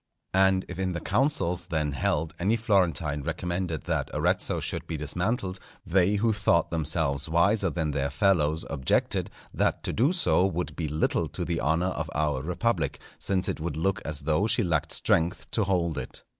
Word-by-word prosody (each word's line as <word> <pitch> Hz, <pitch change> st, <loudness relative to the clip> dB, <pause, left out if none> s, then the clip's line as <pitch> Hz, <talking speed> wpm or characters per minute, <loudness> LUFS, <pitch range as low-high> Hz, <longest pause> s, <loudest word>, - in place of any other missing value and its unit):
And 95 Hz, 0 st, +4 dB
if -, -, -7 dB
in 95 Hz, -1 st, 0 dB
the 85 Hz, -, -2 dB
councils 90 Hz, -, 0 dB
then 80 Hz, -4 st, -1 dB
held 75 Hz, +3 st, -1 dB
any 100 Hz, +6 st, +2 dB
Florentine 85 Hz, -, +1 dB
recommended 85 Hz, +1 st, -3 dB
that -, -, -1 dB
Arezzo -, -, +1 dB
should -, -, -4 dB
be 80 Hz, -, -3 dB
dismantled, 90 Hz, -, -2 dB, 0.3 s
they 95 Hz, +2 st, +3 dB
who 110 Hz, +2 st, +2 dB
thought 95 Hz, -5 st, +2 dB
themselves 80 Hz, -2 st, 0 dB
wiser 95 Hz, +4 st, +3 dB
than 80 Hz, -3 st, -1 dB
their 70 Hz, 0 st, -1 dB
fellows 80 Hz, +1 st, +2 dB
objected, 65 Hz, -4 st, 0 dB, 0.2 s
that -, -, 0 dB
to -, -, -2 dB
do 130 Hz, +8 st, +3 dB
so 175 Hz, -, +2 dB
would 90 Hz, -2 st, -1 dB
be 80 Hz, -, -2 dB
little 75 Hz, +1 st, 0 dB
to -, -, -5 dB
the 85 Hz, -1 st, -1 dB
honour 80 Hz, +4 st, +1 dB
of 80 Hz, -3 st, -3 dB
our 75 Hz, -3 st, 0 dB
republic, 90 Hz, -, -1 dB, 0.2 s
since 95 Hz, -1 st, 0 dB
it -, -, -2 dB
would 80 Hz, 0 st, -3 dB
look 95 Hz, +5 st, 0 dB
as 75 Hz, 0 st, -4 dB
though 80 Hz, +8 st, +1 dB
she 115 Hz, +1 st, +2 dB
lacked 80 Hz, -5 st, 0 dB
strength 85 Hz, +2 st, +1 dB
to 110 Hz, -, +1 dB
hold 85 Hz, -4 st, 0 dB
it. -, -, -8 dB
85 Hz, 180 wpm, -27 LUFS, 75-95 Hz, 0.3 s, And